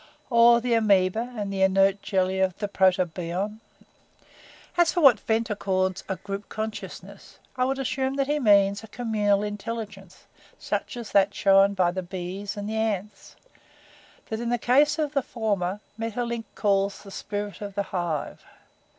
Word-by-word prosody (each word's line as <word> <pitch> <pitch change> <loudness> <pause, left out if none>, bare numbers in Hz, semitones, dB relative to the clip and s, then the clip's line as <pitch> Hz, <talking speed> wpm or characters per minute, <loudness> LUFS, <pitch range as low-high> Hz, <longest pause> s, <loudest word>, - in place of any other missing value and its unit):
Or 235 0 +6
the 240 0 -1
amoeba 215 +1 +2
and 200 -2 -3
the 190 - -2
inert 195 +1 +3
jelly 190 -1 0
of 190 -2 +1
the 210 - -2
Protobion? 185 +1 0 1.2
"As 345 -2 +4
for 355 - -1
what 275 -5 +7
Ventnor 225 -1 -1
calls 190 -1 -1
a 190 - -1
group 195 +2 -7
consciousness 220 0 -7 0.2
I 255 -1 +1
would 265 +1 -1
assume 265 0 -1
that 275 -1 +1
he 295 +2 0
means 200 -3 +4
a - - -10
communal 210 -3 0
intelligence 210 -2 -6 0.3
such - - -3
as 235 -3 -7
that 200 0 +3
shown 195 0 +4
by 180 -2 +2
the 185 +1 -3
bees 185 +3 -6
and 205 0 -4
the 220 +1 -3
ants 215 -2 -3 0.9
that 220 - -3
in 235 0 -3
the 240 - +1
case 285 +6 +3
of 305 -2 -1
the 275 - +2
former 205 -5 -2 0.2
Maeterlinck 230 +1 -3
calls 200 -1 0
the 200 - -11
'Spirit 205 0 -5
of 200 -2 -6
the 200 - 0
Hive.' 175 -4 -3
205 Hz, 160 wpm, -25 LUFS, 195-230 Hz, 1.2 s, what